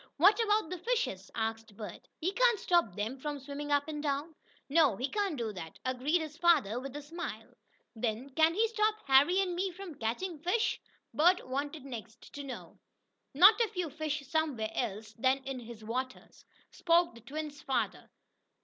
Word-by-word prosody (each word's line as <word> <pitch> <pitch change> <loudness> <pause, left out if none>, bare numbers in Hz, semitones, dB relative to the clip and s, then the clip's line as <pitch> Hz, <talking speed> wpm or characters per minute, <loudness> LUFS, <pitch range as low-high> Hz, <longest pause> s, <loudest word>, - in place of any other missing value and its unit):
"What 390 +8 +6
about 420 -6 +1
the 365 - -4
fishes?" 425 - -1
asked 225 -1 -3
Bert 210 -5 -8
"He 355 +4 -1
can't 485 -1 +4
stop 345 - +2
them 220 +6 -3
from 295 +1 -3
swimming 285 +1 -6
up 285 +1 +2
and 300 -1 -4
down." 290 +2 -2 0.3
"No, 290 -6 +4
he 255 - -1
can't 400 -3 -1
do 225 -3 -3
that," 165 -4 -8
agreed 260 +7 +1
his 310 -1 -7
father, 285 - +4
with 270 +1 -7
a 295 - -5
smile. 335 +4 -7 0.4
"Then 230 +4 -2
can 320 +4 +3
he 450 +3 +3
stop 430 -1 +2
Harry 285 +8 +5
and 365 -2 -1
me 375 +2 0
from 365 -1 -8
catching 295 +8 -3
fish?" 360 +8 0 0.3
Bert 350 +2 +4
wanted 280 +2 -3
next 230 -3 -9
to 285 - -6
know. 265 -3 -8 0.6
"Not 405 - +8
if 440 -2 0
you 350 -4 -2
fish 300 -1 -3
somewhere 275 -9 0
else 215 -2 -3
than 260 +3 +3
in 270 -1 -4
his 230 -2 -10
waters," 255 +4 -5 0.3
spoke 340 -2 +3
the 230 - -14
twins' 295 +4 -6
father. 265 - -2
290 Hz, 175 wpm, -32 LUFS, 245-345 Hz, 0.6 s, Not